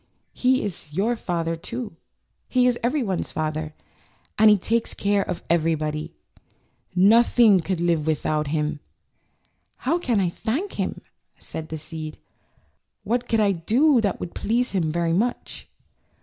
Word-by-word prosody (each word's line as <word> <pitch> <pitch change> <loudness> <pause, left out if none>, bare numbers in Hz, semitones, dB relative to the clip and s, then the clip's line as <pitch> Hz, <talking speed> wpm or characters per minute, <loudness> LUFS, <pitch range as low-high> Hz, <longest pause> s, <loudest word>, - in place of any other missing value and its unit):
^' - - -40 0.3
"He 255 +1 +2
is 180 -6 -4
your 205 +9 0
Father, 165 -5 -2
too. 230 +4 -6 0.5
He 250 -1 +3
is 245 -1 +2
everyone^s 240 - -1
Father, 155 0 -3 0.6
and 215 -1 +6
takes 230 +5 0
care 200 0 +1
of 180 -3 -4
everybody. 160 -1 0 0.8
Noth 220 +8 +5
ing 215 -6 +7
could 180 +1 -2
live 170 -3 +1
without 155 -1 0
him.'' 150 0 -1 1.0
"How 325 +7 0
can 240 -10 +1
I 185 -3 +1
thank 255 - -3
him," - - -2 0.4
said 160 0 -7
the 160 - -4
seed. 155 0 -7 0.9
"What 245 +1 -1
could 225 - +2
I 205 -2 +4
do 240 - +3
that 200 -4 -1
would 170 - -6
please 240 +4 0
him 170 -5 0
very 170 0 0
much?" 235 +8 -2
190 Hz, 145 wpm, -24 LUFS, 160-235 Hz, 1.0 s, ing